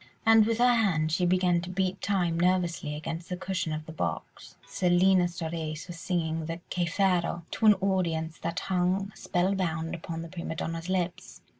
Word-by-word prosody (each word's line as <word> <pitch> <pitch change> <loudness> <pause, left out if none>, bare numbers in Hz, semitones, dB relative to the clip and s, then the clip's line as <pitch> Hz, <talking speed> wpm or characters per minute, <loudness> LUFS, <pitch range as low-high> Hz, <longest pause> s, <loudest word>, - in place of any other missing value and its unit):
And 225 -1 +6
with 230 -1 +1
her 245 +1 +5
hand 175 -9 +2
she 175 +2 +2
began 180 -1 +3
to 175 - -7
beat 190 +1 -1
time 175 -4 0
nervously 175 -4 +1
against 165 +2 -5
the 180 - -3
cushion 185 -3 -2
of 155 0 -4
the 160 - -8
box. 85 - -5
Selina 180 +1 +3
Storace 160 -2 -4
was 170 -2 -8
singing 160 -3 -2
the 165 +1 -4
"Che 175 -1 0
farò" 175 -2 +1
to 220 - +1
an 210 - +8
audience 170 -5 -1
that 170 +3 -3
hung 190 +2 0
spellbound 175 -4 -1
upon 165 0 -5
the - - -7
prima 170 -1 -5
donna's 165 +2 -4
lips. 180 -2 -3
175 Hz, 175 wpm, -28 LUFS, 165-190 Hz, -, an